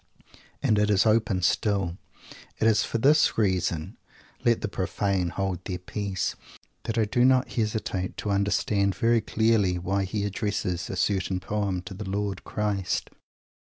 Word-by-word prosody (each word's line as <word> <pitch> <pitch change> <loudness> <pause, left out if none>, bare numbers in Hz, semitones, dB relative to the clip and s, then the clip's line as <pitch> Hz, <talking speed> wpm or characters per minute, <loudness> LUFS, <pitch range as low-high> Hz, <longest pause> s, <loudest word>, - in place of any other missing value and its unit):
_ - - -23 0.2
And 105 - +3
it 105 0 +2
is 105 0 +4
open 110 -4 +2
still. 95 -2 +1 0.6
It - - 0
is 110 -1 +4
for - - -2
this 145 +6 +4
reason 90 -6 0 0.5
let 120 -1 +3
the - - -1
profane 95 -2 -1
hold 95 -1 -3
their 90 - -3
peace! 95 0 -3 0.5
that 115 - -2
I 110 - +3
do 120 +4 +1
not 130 0 +4
hesitate 105 -5 -2
to 105 - -2
understand 100 0 +1
very 115 +4 +3
clearly 110 -5 +2
why 95 +2 -1
he 100 +2 -2
addresses 100 -3 -2
a - - -3
certain 95 0 0
poem 100 -2 -2
to 95 - -8
the 95 0 -6
Lord 100 0 -2
Christ! 100 -3 -2
100 Hz, 155 wpm, -26 LUFS, 95-110 Hz, 0.6 s, is